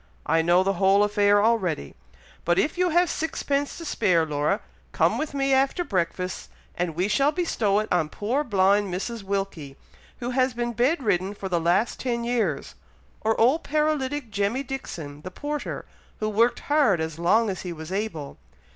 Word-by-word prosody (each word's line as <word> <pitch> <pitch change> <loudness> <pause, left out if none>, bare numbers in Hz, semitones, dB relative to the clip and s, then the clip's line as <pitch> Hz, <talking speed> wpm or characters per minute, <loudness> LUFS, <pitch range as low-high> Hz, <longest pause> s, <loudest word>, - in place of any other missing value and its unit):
I 165 0 +3
know 175 +3 +4
the 195 +1 +1
whole 195 +1 +5
affair 205 0 +3
already; 190 - 0 0.5
but 175 +1 +2
if 300 - +1
you 360 0 +2
have 350 +2 +3
sixpence 285 -3 -2
to 335 - -8
spare, 180 - +2
Laura, 150 +5 0 0.3
come - - +2
with 310 -2 -3
me 275 -1 +1
after 270 +6 +2
breakfast, 185 - -2 0.3
and 175 -2 -2
we 180 +3 +1
shall 275 +8 +3
bestow 230 - 0
it 215 +1 0
on 160 -4 +1
poor 240 - -1
blind 200 -3 +2
Mrs. 220 +5 -4
Wilkie, 195 -8 -4 0.4
who 245 0 -4
has 255 -1 +1
been 240 0 -2
bed 260 +6 +1
ridden 195 -1 0
for 195 -1 -6
the 175 -2 0
last 175 +7 +1
ten 235 -2 -2
years; 225 - -1 0.5
or 220 0 0
old 260 +8 +4
paralytic 290 -4 -1
Jemmy 205 +6 0
Dixon 165 - -7
the 185 - -7
porter, 290 +10 -5 0.3
who 215 - -1
worked 230 +3 +2
hard 285 - +3
as 160 0 -4
long 220 +7 +3
as 185 - -5
he 180 - -5
was 160 0 -8
able. 190 -8 -4
210 Hz, 175 wpm, -25 LUFS, 180-265 Hz, 0.5 s, whole